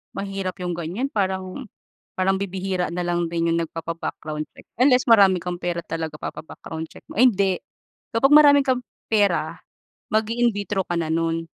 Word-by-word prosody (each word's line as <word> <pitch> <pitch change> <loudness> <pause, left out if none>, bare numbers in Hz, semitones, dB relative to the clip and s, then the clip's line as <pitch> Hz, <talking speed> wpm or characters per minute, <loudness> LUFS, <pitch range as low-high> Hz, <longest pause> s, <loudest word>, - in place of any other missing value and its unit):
Mahirap 195 -1 -4
'yong 180 -1 -3
ganyan 175 +10 -3
parang 190 -1 -2 0.6
parang 190 +1 +3
bibihira 190 -2 -2
na 180 - -4
lang 175 -1 -1
din 170 0 0
'yong 165 0 +1
nagpapa-background 165 -2 -5
check, - - -17
unless, 255 +1 +4
marami 200 -5 +6
kang 180 0 -4
pera 175 0 -3
talaga 160 -2 -5
papa-background 160 0 -7
check - - -14
mo, - - -11
ay, 250 +4 +6
hindi, 195 -2 +1 0.6
kapag 230 +4 +3
marami 290 -1 +8
kang 255 -2 0 0.2
pera 195 -7 +1 0.5
mag-i-in 225 +3 +1
vitro 200 -1 -2
ka 175 - -1
na 160 -1 -1
no'n. 165 0 0
185 Hz, 160 wpm, -23 LUFS, 165-210 Hz, 0.6 s, marami